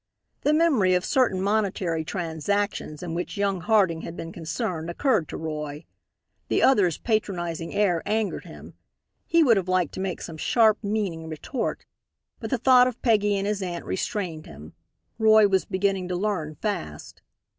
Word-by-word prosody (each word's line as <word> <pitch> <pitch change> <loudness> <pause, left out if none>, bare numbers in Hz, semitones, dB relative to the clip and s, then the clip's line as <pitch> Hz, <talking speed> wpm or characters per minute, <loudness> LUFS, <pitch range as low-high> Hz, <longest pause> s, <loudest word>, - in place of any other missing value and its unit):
The 295 - +2
memory 285 - +3
of 180 - 0
certain 245 -8 +2
monetary 195 -5 0
transactions 170 0 -2
in 170 -2 -4
which 175 +5 -4
young 200 -2 0
Harding 185 -5 +2
had 170 - -8
been 165 - -6
concerned 170 0 -4
occurred 210 - +1
to - - -5
Roy. 150 -1 -5 0.6
The - - +1
other's 200 - +4
patronizing 175 -7 -2
air 180 -5 +2
angered 215 0 -1
him. - - -12 0.5
He 335 -1 +4
would 235 -7 +5
have 185 -2 -1
liked 185 -3 +1
to - - -6
make 190 -2 -3
some 165 -2 -7
sharp, 220 +5 +3
meaning 200 -6 -2
retort. 160 - -4 0.5
But - - -5
the 260 - +1
thought 250 +1 +6
of 250 -1 -5
Peggy 210 -4 +3
and 195 - -2
his 205 -1 -1
aunt 175 -2 -4
restrained 185 -6 -3
him. 75 +3 -12 0.5
Roy 220 -1 +6
was 190 -1 +1
beginning 190 -1 -1
to 180 - -2
learn 175 -6 -2
fast. 80 - -5
190 Hz, 165 wpm, -25 LUFS, 165-215 Hz, 0.6 s, thought